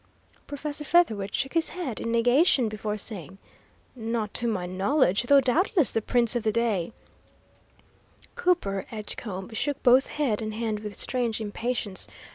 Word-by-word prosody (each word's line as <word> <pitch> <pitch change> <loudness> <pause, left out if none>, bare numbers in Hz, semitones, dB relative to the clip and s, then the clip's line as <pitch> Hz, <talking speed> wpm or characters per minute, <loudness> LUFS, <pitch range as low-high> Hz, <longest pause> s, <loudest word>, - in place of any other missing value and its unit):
Professor 290 +1 -3
Featherwit 220 - +2
shook 270 0 -2
his 330 -1 +2
head 320 -11 -5
in 230 - -3
negation 245 +2 +4
before 215 0 -3
saying: 195 -3 -6 0.6
"Not 225 -3 -3
to 240 - 0
my 195 -6 -1
knowledge, 195 +3 +2
though 275 +3 +5
doubtless 320 - +2
the 225 - 0
prints 240 +1 +1
of 240 - +1
the 220 0 +1
day 220 -5 0 0.7
" - - -30
Cooper 200 - 0
Edgecombe 210 -2 -6
shook 280 +5 -2
both 255 +1 +6
head 250 -8 -1
and 215 -1 -4
hand 220 -2 -2
with 210 -1 -7
strange 240 -3 -1
impatience. 220 -1 -3
230 Hz, 150 wpm, -26 LUFS, 210-270 Hz, 0.7 s, both